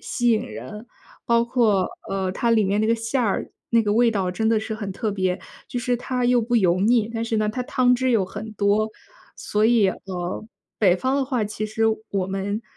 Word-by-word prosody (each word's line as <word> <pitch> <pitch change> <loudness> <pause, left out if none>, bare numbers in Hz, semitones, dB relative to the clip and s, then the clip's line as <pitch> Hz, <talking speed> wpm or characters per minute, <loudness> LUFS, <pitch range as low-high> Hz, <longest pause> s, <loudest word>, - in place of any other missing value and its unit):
吸 240 0 0
引 220 -2 +3
人。 225 -2 -8 0.4
包 235 0 +3
括， 225 -6 +2 0.2
呃， 190 -1 -1
它 235 +4 0
里 225 -2 +4
面 200 +2 +1
那 215 - +1
个 230 - +3
馅 230 +3 -1
儿， 210 -5 -1 0.2
那 230 -1 +4
个 205 - 0
味 235 +2 +4
道 195 -4 -1
真 220 +5 0
的 225 -1 +3
是 220 0 -4
很 205 -2 -5
特 215 +2 -2
别。 185 -2 -1 0.3
就 245 - -3
是 245 0 0
它 250 0 -2
又 245 0 +4
不 235 +2 -2
油 185 -4 +3
腻， 225 +1 +3
但 225 0 -2
是 225 -1 -1
呢， 215 0 +1
它 250 +4 -2
汤 250 0 +3
汁 260 +1 0
又 215 -5 +3
很 215 +3 -7
多。 210 +1 +1 0.5
所 210 +1 +1
以， 225 -4 +4
呃， 185 +1 -5 0.3
北 185 -4 +4
方 260 +6 0
的 275 - +1
话， 250 -5 -1
其 215 +1 -4
实 215 +1 -3 0.3
我 195 -2 -1
们 195 +3 -3
220 Hz, 235 characters per minute, -23 LUFS, 200-235 Hz, 0.5 s, 里